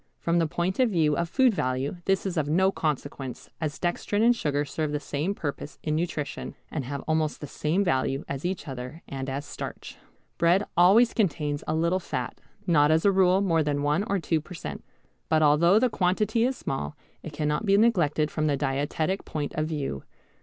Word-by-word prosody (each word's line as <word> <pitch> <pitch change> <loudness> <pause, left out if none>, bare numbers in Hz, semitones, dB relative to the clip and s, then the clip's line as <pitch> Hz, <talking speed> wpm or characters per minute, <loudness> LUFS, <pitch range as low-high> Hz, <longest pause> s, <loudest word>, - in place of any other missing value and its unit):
From 170 0 +1
the 165 - +2
point 175 +6 -2
of 255 -2 +4
view 160 -6 +2
of 170 +1 -1
food 260 +3 +4
value 130 0 -1
this 195 0 +1
is 190 -2 -2
of 150 -3 0
no 190 +5 +3
consequence, 145 -6 -4
as 155 -2 -2
dextrin 205 +4 0
and 240 +1 +5
sugar 145 -7 -1
serve 155 +1 -3
the 150 - -1
same 150 +7 -2
purpose 145 -2 -5
in 155 -1 0
nutrition, 155 -3 -3 0.2
and 145 -5 -3
have 140 +1 -4
almost 155 -1 0
the - - -6
same 155 +7 0
value 135 -4 0
as 140 0 -5
each 180 -1 -3
other 130 +4 -7
and 135 -1 -5
as 140 +2 -4
starch. - - -7 0.4
Bread 175 +4 +4
always 200 +8 +6
contains 150 -8 0
a 155 - 0
little 170 +3 +1
fat, 125 -8 -5 0.2
not 150 -4 +4
as 160 +3 +3
a 200 - +6
rule 190 0 +4
more 165 -5 +2
that 145 -1 0
one 145 +6 +1
or 200 - 0
two 165 -2 0
per 180 +4 -10
cent. - - -6 0.5
But 155 -1 +3
although 165 +6 +5
the 255 +3 +4
quantity 215 +3 +1
is 260 0 -1
small 75 - -4 0.2
it 160 - -7
cannot 150 +7 -1
be 200 0 +5
neglected 170 -9 +2
from 155 -1 0
the 145 -2 +1
dietetic 145 +6 -1
point 150 -2 -4
of 155 0 -1
view. 140 - -3
155 Hz, 200 wpm, -26 LUFS, 145-185 Hz, 0.5 s, always